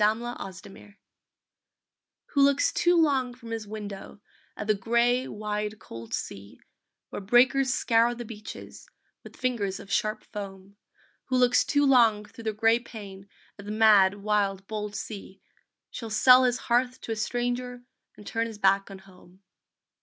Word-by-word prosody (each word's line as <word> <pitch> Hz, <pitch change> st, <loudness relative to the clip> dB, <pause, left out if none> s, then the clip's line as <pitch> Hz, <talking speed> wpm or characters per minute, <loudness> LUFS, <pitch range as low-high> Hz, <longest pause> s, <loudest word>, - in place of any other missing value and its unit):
THE 210 Hz, +1 st, +5 dB
GREAT 240 Hz, -4 st, -6 dB
SEDUCER 200 Hz, +2 st, -14 dB, 1.3 s
Who 280 Hz, -, +1 dB
looks 280 Hz, 0 st, +3 dB
too 350 Hz, 0 st, +3 dB
long 265 Hz, -6 st, +1 dB
from 235 Hz, -2 st, -11 dB
his 225 Hz, -2 st, -4 dB
window 205 Hz, -1 st, -8 dB, 0.4 s
At 210 Hz, -, -5 dB
the 215 Hz, -, +3 dB
gray, 235 Hz, +5 st, +1 dB
wide, 210 Hz, 0 st, -4 dB
cold 115 Hz, -, -7 dB
sea, 100 Hz, +1 st, -8 dB, 0.5 s
Where -, -, -5 dB
breakers 245 Hz, +5 st, +3 dB
scour 235 Hz, -1 st, +2 dB
the 240 Hz, 0 st, -7 dB
beaches 215 Hz, -1 st, -10 dB, 0.3 s
With -, -, -13 dB
fingers 220 Hz, -7 st, -2 dB
of 195 Hz, -, -11 dB
sharp 215 Hz, -1 st, -1 dB
foam; 195 Hz, -2 st, -9 dB, 0.5 s
Who 255 Hz, -, 0 dB
looks 250 Hz, 0 st, +4 dB
too 290 Hz, -1 st, +2 dB
long 230 Hz, -6 st, +4 dB
thro 210 Hz, +3 st, -13 dB
the 220 Hz, -, -1 dB
gray 225 Hz, +2 st, +3 dB
pane 200 Hz, -4 st, -11 dB, 0.3 s
At 200 Hz, -, -10 dB
the 205 Hz, -, -5 dB
mad, 210 Hz, -3 st, +5 dB
wild, 200 Hz, -2 st, 0 dB
bold 210 Hz, 0 st, -5 dB
sea, 195 Hz, -3 st, -7 dB, 0.5 s
Shall 230 Hz, -2 st, -7 dB
sell 250 Hz, +4 st, +6 dB
his 245 Hz, -1 st, +1 dB
hearth 250 Hz, +1 st, 0 dB
to -, -, -6 dB
a -, -, -1 dB
stranger 245 Hz, +2 st, -3 dB, 0.3 s
And 210 Hz, -, -13 dB
turn 230 Hz, +2 st, -2 dB
his 225 Hz, -2 st, -9 dB
back 195 Hz, 0 st, +2 dB
on 195 Hz, -, -9 dB
home. 190 Hz, 0 st, -19 dB
220 Hz, 160 wpm, -27 LUFS, 200-245 Hz, 1.3 s, sell